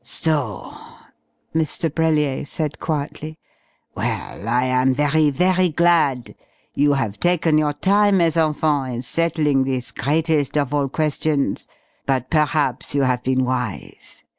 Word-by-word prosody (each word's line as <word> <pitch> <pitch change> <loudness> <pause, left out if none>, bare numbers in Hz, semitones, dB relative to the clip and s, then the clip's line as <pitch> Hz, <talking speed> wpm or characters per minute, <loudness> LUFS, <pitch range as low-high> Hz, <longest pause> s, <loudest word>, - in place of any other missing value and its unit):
"So?" 130 - -2 0.8
Mr. 160 -1 -1
Brellier 155 -4 +1
said 150 -1 -3
quietly. 155 0 -4 0.6
"Well, 105 - -4
I 120 +2 +2
am 130 +1 +2
very, 150 +2 +2
very 180 +5 +2
glad. 160 -7 +1 0.4
You 145 0 +2
have 115 -7 -2
taken 170 -3 +2
your 150 -1 0
time, 200 +5 +2
mes 165 -3 +2
enfants, 150 -5 0
in 120 - -4
settling 150 -2 +1
this 130 -2 -2
greatest 155 -1 0
of 145 -1 -1
all 140 -2 0
questions, 150 -1 -1 0.4
but 130 -2 -1
perhaps 150 -2 0
you 140 - +2
have 125 -1 +1
been 130 0 0
wise.... 125 -5 -5
145 Hz, 130 wpm, -21 LUFS, 130-160 Hz, 0.8 s, I